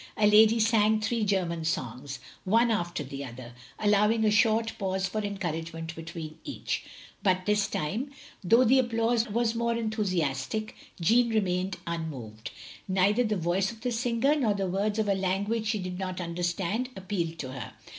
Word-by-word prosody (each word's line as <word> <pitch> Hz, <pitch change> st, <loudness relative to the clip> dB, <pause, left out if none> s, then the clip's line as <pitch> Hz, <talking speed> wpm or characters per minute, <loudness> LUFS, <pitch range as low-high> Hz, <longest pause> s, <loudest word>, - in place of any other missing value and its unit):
A 215 Hz, -, +3 dB
lady 215 Hz, +2 st, +6 dB
sang 220 Hz, -1 st, +4 dB
three 220 Hz, +1 st, 0 dB
German 180 Hz, -5 st, 0 dB
songs, 135 Hz, -2 st, -3 dB, 0.3 s
one 230 Hz, +5 st, +3 dB
after 175 Hz, -7 st, -1 dB
the 140 Hz, +1 st, -6 dB
other, 120 Hz, -1 st, -9 dB, 0.2 s
allowing 210 Hz, +2 st, +3 dB
a 210 Hz, -, +4 dB
short 225 Hz, +1 st, +3 dB
pause 190 Hz, -1 st, -1 dB
for 215 Hz, +3 st, -2 dB
encouragement 165 Hz, -5 st, -4 dB
between 165 Hz, -1 st, -7 dB
each; 290 Hz, -, -3 dB, 0.4 s
but 185 Hz, -2 st, +1 dB
this 210 Hz, -1 st, +2 dB
time, 210 Hz, -, -2 dB, 0.3 s
though 230 Hz, +7 st, +5 dB
the 260 Hz, +2 st, +5 dB
applause 230 Hz, -1 st, +1 dB
was 230 Hz, +1 st, +1 dB
more 235 Hz, 0 st, 0 dB
enthusiastic, 205 Hz, -, -1 dB, 0.2 s
Jeanne 235 Hz, +8 st, +4 dB
remained 190 Hz, -4 st, 0 dB
tmmoved; 135 Hz, -10 st, -5 dB, 0.4 s
neither 195 Hz, +5 st, +3 dB
the 215 Hz, -3 st, 0 dB
voice 180 Hz, +4 st, 0 dB
of 225 Hz, -1 st, -13 dB
the 245 Hz, +1 st, -1 dB
singer, 245 Hz, +4 st, +1 dB
nor 230 Hz, -9 st, +1 dB
the 195 Hz, -1 st, -1 dB
words 200 Hz, +3 st, -1 dB
of 215 Hz, -1 st, +1 dB
a 200 Hz, -, +3 dB
language 200 Hz, +4 st, -1 dB
she 210 Hz, 0 st, +1 dB
did 185 Hz, -1 st, -5 dB
not 185 Hz, -1 st, -3 dB
understand, 175 Hz, +7 st, -2 dB
appealed 180 Hz, -4 st, -3 dB
to 130 Hz, -4 st, -5 dB
her. 125 Hz, -4 st, -7 dB
200 Hz, 165 wpm, -28 LUFS, 170-225 Hz, 0.4 s, lady